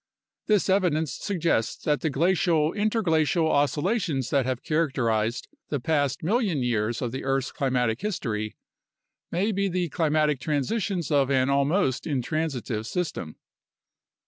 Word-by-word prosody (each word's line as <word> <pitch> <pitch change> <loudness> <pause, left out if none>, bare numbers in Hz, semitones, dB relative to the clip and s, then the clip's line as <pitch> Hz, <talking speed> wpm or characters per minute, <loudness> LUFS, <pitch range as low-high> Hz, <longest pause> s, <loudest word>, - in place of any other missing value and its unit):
This 210 -3 +3
evidence 175 -6 +1
suggests 170 - -1
that 150 -1 +1
the 160 - 0
glacial 165 +1 +2
interglacial 180 -6 +1
oscillations 145 - 0
that 135 -3 +2
have 130 -2 -2
characterized 120 -8 0 0.2
the 145 - -1
past 145 0 0
million 190 - +1
years 115 0 0
of 120 - -2
the 130 - -5
earth's 135 0 0
climatic 125 -4 0
history 115 - -3 0.8
may 195 +6 +1
be 200 0 0
the 180 -2 -1
climatic 150 -2 +1
transitions 170 - -1
of 140 -2 +3
an 130 0 +2
almost 140 0 +1
intransitive 130 -5 -2
system. 155 - -3
150 Hz, 125 wpm, -26 LUFS, 130-175 Hz, 0.8 s, This